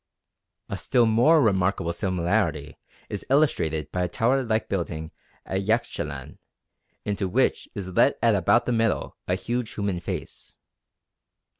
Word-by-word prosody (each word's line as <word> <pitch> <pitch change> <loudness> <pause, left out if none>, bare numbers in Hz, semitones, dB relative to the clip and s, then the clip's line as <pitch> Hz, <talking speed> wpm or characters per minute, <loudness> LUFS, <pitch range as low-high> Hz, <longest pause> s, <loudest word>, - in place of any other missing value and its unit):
A - - -5
still 120 -2 +3
more 120 +9 +5
remarkable 95 -5 +1
similarity 85 -5 -1 0.3
is 105 - -4
illustrated 80 - +1
by 90 - -1
a 90 - +1
tower 120 +9 +1
like 110 -3 -1
building 80 -4 -3 0.3
at 95 0 -2
Yaxchilan 75 - -2 0.7
into 100 -1 -1
which 90 - +1
is 95 -2 -5
let 90 - +3
at - - +5
about - - +3
the - - -1
middle 115 -2 0
a 90 - +1
huge 120 +3 -3
human 100 -4 -1
face. 85 - -7
100 Hz, 135 wpm, -25 LUFS, 85-115 Hz, 0.7 s, more